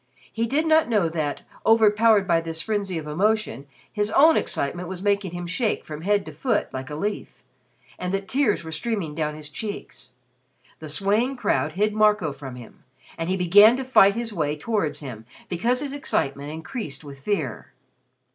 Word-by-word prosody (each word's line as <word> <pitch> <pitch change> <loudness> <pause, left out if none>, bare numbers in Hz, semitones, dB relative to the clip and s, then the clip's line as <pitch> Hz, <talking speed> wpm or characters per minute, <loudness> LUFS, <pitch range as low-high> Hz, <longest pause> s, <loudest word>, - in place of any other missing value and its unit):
He 230 +1 -1
did 295 +7 +1
not 315 -3 +4
know 205 -7 +2
that, 155 -3 -3 0.2
overpowered 220 -2 +4
by 170 -2 +3
this 165 -1 -6
frenzy 205 -5 -2
of 155 - -5
emotion, 165 - 0 0.3
his 210 0 0
own 315 +8 +6
excitement 175 +5 -2
was 190 0 -6
making 200 -1 +1
him 175 +1 -6
shake 200 +6 -1
from 150 0 -7
head 200 +2 +1
to - - -7
foot 250 -5 -1
like 130 0 -5
a 150 - -5
leaf, 205 +7 -4 0.6
and 180 0 -3
that 195 0 -2
tears 260 -10 +1
were 160 - -7
streaming 170 -1 -3
down 150 -1 -2
his 155 -1 -9
cheeks. 205 - -7 0.7
The 155 - -8
swaying 210 - 0
crowd - - 0
hid 210 +3 +1
Marco 210 -8 +3
from 135 -2 -9
him, 120 -2 -13 0.3
and 165 +1 -4
he 190 - +1
began 205 +6 +7
to 265 - -3
fight 200 -6 +5
his 230 -1 -3
way 150 -4 -1
towards 165 -4 -1
him 120 -6 -8 0.2
because 235 +8 0
his 280 -2 -4
excitement 140 - -2
increased 160 - -6
with 140 -2 -10
fear. 140 - -3
195 Hz, 180 wpm, -24 LUFS, 155-220 Hz, 0.7 s, began